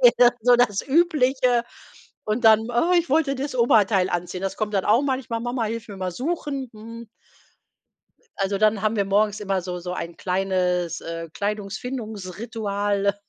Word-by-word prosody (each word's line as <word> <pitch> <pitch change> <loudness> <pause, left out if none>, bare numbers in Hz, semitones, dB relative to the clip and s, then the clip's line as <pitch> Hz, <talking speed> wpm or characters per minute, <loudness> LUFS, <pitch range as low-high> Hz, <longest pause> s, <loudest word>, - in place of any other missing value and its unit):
eher 245 -1 +6
so 245 +2 +5
das 210 -5 +2
Übliche. 265 -6 +2 0.6
Und 215 +3 -2
dann: 220 0 +5
„Oh, 285 +10 +2
ich 340 -3 -2
wollte 295 -2 +2
das 275 +1 -4
Oberteil 210 -6 +3
anziehen.“ 180 +1 -3
Das 195 - -3
kommt 215 -1 -2
dann 195 -2 0
auch 225 +5 +4
manchmal: 260 -4 -2
„Mama 240 0 -2
hilf 230 +1 -4
mir 200 -2 -9
mal 185 -1 -2
suchen.” 275 - -3
Hm. 230 +2 -10 1.3
Also, 195 0 0
dann 215 0 +3
haben 215 +1 +1
wir 200 - +2
morgens 205 +2 +1
immer 195 -2 -1
so 180 0 -5
so 180 +1 -5
ein 170 -1 -5
kleines, 180 -2 -1
äh, 165 0 -6
Kleidungsfindungs-Ritual, 205 -1 -3
215 Hz, 160 wpm, -23 LUFS, 195-245 Hz, 1.3 s, eher